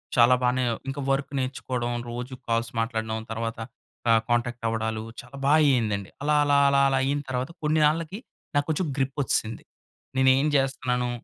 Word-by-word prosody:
చాలా 120 Hz, +1 st, +6 dB
బానే, 125 Hz, +1 st, +2 dB, 0.3 s
ఇంకా 140 Hz, +1 st, -4 dB
వర్క్ 135 Hz, +1 st, -1 dB
నేర్చుకోవడం. 130 Hz, -2 st, -2 dB, 0.2 s
రోజు 125 Hz, +2 st, -5 dB
కాల్స్ 115 Hz, 0 st, 0 dB
మాట్లాడడం. 110 Hz, -1 st, -2 dB
తర్వాత 115 Hz, 0 st, -3 dB, 0.5 s
ఆహ్, 115 Hz, -1 st, +5 dB
కాంటాక్ట్ 120 Hz, 0 st, 0 dB
అవ్వడాలు. 110 Hz, -1 st, -2 dB, 0.2 s
చాలా 125 Hz, +3 st, -13 dB
బాగా 145 Hz, +3 st, +5 dB
అయిందండి. 105 Hz, -6 st, 0 dB
అలా, 150 Hz, +1 st, +2 dB
అలా, 145 Hz, -1 st, +3 dB
అలా, 140 Hz, 0 st, +3 dB
అలా 135 Hz, -, +1 dB
అయిన 140 Hz, +2 st, 0 dB
తర్వాత 130 Hz, +2 st, -2 dB
కొన్ని 155 Hz, +1 st, +2 dB
నాళ్ళకి 165 Hz, +5 st, 0 dB, 0.4 s
నాకు 145 Hz, 0 st, +2 dB
కొంచెం 160 Hz, +2 st, 0 dB
గ్రిప్ 135 Hz, 0 st, -1 dB
వచ్చిసింది. 115 Hz, -3 st, -1 dB, 0.5 s
నేను 130 Hz, 0 st, +5 dB
ఏం 145 Hz, -, +2 dB
జేస్తున్నాను. 125 Hz, -2 st, 0 dB
125 Hz, 160 wpm, -26 LUFS, 115-140 Hz, 0.5 s, చాలా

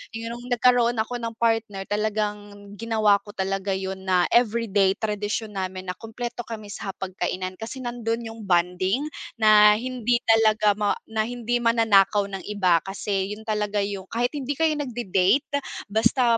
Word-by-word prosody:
yung 235 Hz, +2 st, -6 dB
nagkaroon 245 Hz, -1 st, +3 dB
ako 245 Hz, +2 st, -4 dB
ng 230 Hz, -1 st, -5 dB
partner, 225 Hz, -4 st, 0 dB
talagang 205 Hz, -1 st, -3 dB
ginawa 220 Hz, -3 st, +3 dB
ko 205 Hz, -3 st, -12 dB
talaga 195 Hz, +1 st, -1 dB
yun 190 Hz, 0 st, -5 dB
na 180 Hz, -1 st, +3 dB
everyday, 215 Hz, -5 st, +3 dB
tradisyon 210 Hz, +1 st, -3 dB
namin 185 Hz, 0 st, -4 dB
na -, -, -9 dB
kumpleto 240 Hz, +2 st, -6 dB
kami 215 Hz, -3 st, -7 dB
sa 195 Hz, -, -5 dB
hapag-kainan. 185 Hz, 0 st, -4 dB
Kasi 235 Hz, +4 st, -6 dB
nandun 235 Hz, -1 st, -3 dB
yung 225 Hz, -1 st, -8 dB
bonding 185 Hz, +8 st, +1 dB, 0.3 s
na 210 Hz, -1 st, +7 dB
hindi 245 Hz, 0 st, 0 dB
talaga 215 Hz, -2 st, +4 dB
ma 210 Hz, -1 st, +1 dB, 0.2 s
na 220 Hz, -1 st, 0 dB
hindi 240 Hz, 0 st, -1 dB
mananakaw 220 Hz, -3 st, +3 dB
ng 195 Hz, -, -5 dB
iba. 185 Hz, -5 st, +3 dB
Kasi 195 Hz, +1 st, -2 dB
yun 220 Hz, -, -13 dB
talaga 210 Hz, -1 st, -1 dB
yung 200 Hz, -1 st, -5 dB
kahit 240 Hz, +2 st, 0 dB
hindi 285 Hz, -1 st, -2 dB
kayo 320 Hz, +2 st, +2 dB
nagde-date 240 Hz, -2 st, +1 dB, 0.4 s
basta 230 Hz, +2 st, +3 dB
215 Hz, 150 wpm, -24 LUFS, 195-235 Hz, 0.4 s, na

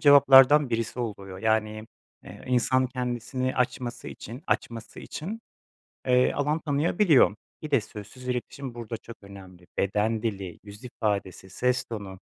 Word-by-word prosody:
cevaplardan 140 Hz, -1 st, +7 dB
birisi 115 Hz, +1 st, -2 dB
oluyor, 100 Hz, -5 st, -5 dB
yani 110 Hz, 0 st, 0 dB, 0.4 s
m -, -, -13 dB
eee, -, -, -12 dB
insan 130 Hz, +1 st, +2 dB
kendisini 125 Hz, +1 st, -3 dB
açması 125 Hz, -1 st, -2 dB
için, 120 Hz, +7 st, -9 dB
açması 115 Hz, -1 st, -3 dB
için, 210 Hz, +9 st, -6 dB, 0.7 s
eee, 125 Hz, 0 st, +4 dB
alan 150 Hz, +3 st, 0 dB
tanıyabiliyor. 150 Hz, -, +3 dB, 0.3 s
Bir 155 Hz, -1 st, -7 dB
de 135 Hz, -6 st, +4 dB
sözsüz 110 Hz, +5 st, -10 dB
iletişim 125 Hz, +1 st, -4 dB
burada 115 Hz, -1 st, -5 dB
çok 115 Hz, +1 st, -12 dB
önemli. 95 Hz, -3 st, -13 dB
Beden 105 Hz, +3 st, 0 dB
dili, 95 Hz, -6 st, -4 dB
yüz 105 Hz, +4 st, -12 dB
ifadesi, 100 Hz, -6 st, -3 dB
ses 125 Hz, +5 st, 0 dB
tonu, 100 Hz, -4 st, -7 dB
120 Hz, 135 wpm, -27 LUFS, 105-130 Hz, 0.7 s, cevaplardan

